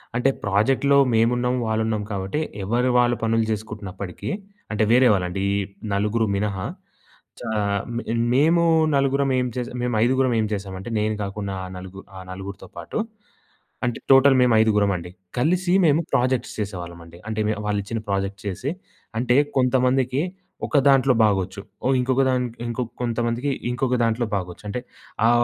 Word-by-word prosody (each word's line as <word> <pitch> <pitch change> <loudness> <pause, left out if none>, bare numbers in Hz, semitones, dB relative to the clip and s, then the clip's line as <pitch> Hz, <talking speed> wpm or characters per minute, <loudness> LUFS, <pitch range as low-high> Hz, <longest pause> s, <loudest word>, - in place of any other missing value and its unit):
అంటే 125 +3 +3
ప్రాజెక్ట్‌లో 130 +8 +3 0.2
మేమున్నాం, 120 +2 +2
వాళ్ళున్నాం 110 -1 0
కాబట్టి 95 +7 -2 0.2
ఎవరి 120 +6 +1
వాళ్ళు 120 0 +3
పనులు 115 0 +2
చేసుకుంటున్నప్పటికీ 100 -3 -5 0.4
అంటే, 105 0 +1
వేరే 125 +2 +6
వాళ్ళండి, 90 0 -1
ఈ - - +1 0.4
నలుగురు 105 +3 +1
మినహా. 100 -2 -2 0.7
చ - - -13 0.6
మే 120 - -3 0.3
మేము 160 +6 +4 0.3
నలుగురం 140 0 +2
ఏం 125 - +1
చేస 125 -1 -2
మేం 125 -1 -1
ఐదుగురం 130 +1 +2
ఏం 110 - +1
చేసామంటే, 95 +1 -5
నేను 110 0 0
కాకుండా 100 0 -4
ఆ - - -6
నలుగు 95 +1 -9 0.2
ఆ - - -7
నలుగురితో 95 +1 -8
పాటు. - - -4 0.9
అంటే, 120 -2 -2
టోటల్ 135 0 +7
మేము 125 -2 +4
ఐదుగురమండి. 100 -5 +1 0.3
కలిసి 175 +6 +2
మేము 155 +1 +4
ప్రాజెక్ట్స్ 130 -1 +1
చేసేవాళ్ళమండి. 85 -4 -6
అంటే, 110 0 -3
మే - - +2
వాళ్ళిచ్చిన 105 +2 -2
ప్రాజెక్ట్స్ 100 0 -2
చేసి, 125 +10 -3 0.5
అంటే, 125 +2 +2 0.2
కొంతమందికి 130 +1 +2 0.5
ఒక - - +1
దాంట్లో 135 -1 +5
బాగొచ్చు. 100 -2 0 0.2
ఓ - - +3
ఇంకొక 130 +1 +2
దాం 130 -1 +2 0.3
ఇంకొ 120 +2 -2 0.2
కొంతమందికి 120 +3 -1 0.2
ఇంకొక 125 0 0
దాంట్లో 115 +1 +1
బాగొచ్చు. 90 -1 -5
అంటే, 125 +5 -3 0.5
ఆ - - +5
115 Hz, 140 wpm, -23 LUFS, 100-125 Hz, 0.9 s, టోటల్